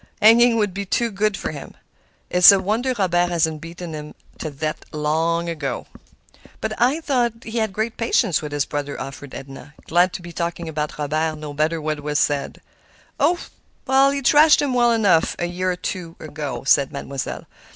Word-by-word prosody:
hanging 230 +2 +6
would 205 -4 0
be 200 +1 -3
too 230 +4 0
good 205 0 0
for - - -4
him. 145 -3 -9 0.6
It's 180 +1 +9
a 195 - +3
wonder 230 +7 -1
Robert 175 -3 +2
hasn't 160 -3 0
beaten 170 0 -8
him 150 0 -8 0.2
to 155 - -4
death 155 +2 -4
long 160 +3 0
ago." 145 -7 -4 0.9
"I 265 +7 +2
thought 240 -6 -1
he 225 +1 -3
had 220 -2 0
great 220 +3 -3
patience 230 -5 +1
with 150 -1 -6
his 145 -1 0
brother," 145 -1 -4
offered 135 0 -8
Edna, 135 +2 -10
glad 175 +2 +3
to 175 - -6
be 175 - -8
talking 170 0 -4
about 150 -1 -4
Robert, 155 +2 -1
no 150 -1 -7
matter 155 +3 0
what 155 -1 -3
was 150 0 -2
said. 145 -2 -1 0.6
"Oh! 350 0 +2 0.7
he 280 0 -2
thrashed 300 +4 +6
him 280 -3 0
well 240 -1 +4
enough 205 -8 +3
a 175 - -1
year 180 +1 -1
or - - -2
two 180 -2 -5
ago," 145 -4 -6
said 140 0 +3
Mademoiselle. 140 -2 -5
170 Hz, 180 wpm, -21 LUFS, 150-215 Hz, 0.9 s, It's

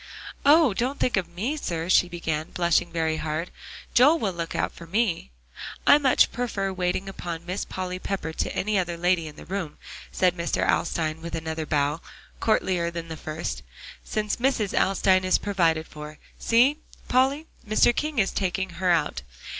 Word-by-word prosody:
"Oh! 300 -5 +6
don't 250 +7 -2
think 250 - +1
of 185 -3 -1
me, 210 - -2
sir," 170 - -3
she 180 -1 +4
began, 160 -3 -3
blushing 175 -1 +1
very 160 -1 0
hard. 155 +3 -3 0.4
"Joel 290 +7 +6
will 205 - -1
look 170 -1 -4
out - - 0
for 170 - -12
me." 195 - 0 0.6
"I 290 - +7
much 270 -3 +4
prefer 205 -6 -2
waiting 180 +1 -1
upon 170 -3 -6
Miss 185 +3 -3
Polly 185 -1 -4
Pepper 185 -4 -3
to - - -2
any 210 0 +1
other 175 -2 -2
lady 175 -1 +1
in 150 - -10
the - - -12
room," 185 -4 -4 0.3
said 180 -2 +2
Mr. 170 -1 -1
Alstyne, 160 -1 0
with 170 0 -5
another 160 -1 -4
bow, 145 +2 0 0.4
courtlier 185 -6 +1
than 170 -1 -6
the 160 - -5
first, 155 +2 -5 0.4
"since 210 -2 -2
Mrs. 240 -5 0
Alstyne 190 -1 +3
is 185 0 +3
provided 165 -6 +1
for. 150 0 -10 0.2
See, 250 +6 +4 0.3
Polly, 270 +5 +2 0.2
Mr. 225 +2 +4
King 305 -2 -2
is 195 -3 +2
taking 190 0 -1
her 185 - +2
out. 155 - +1
180 Hz, 170 wpm, -25 LUFS, 165-215 Hz, 0.6 s, I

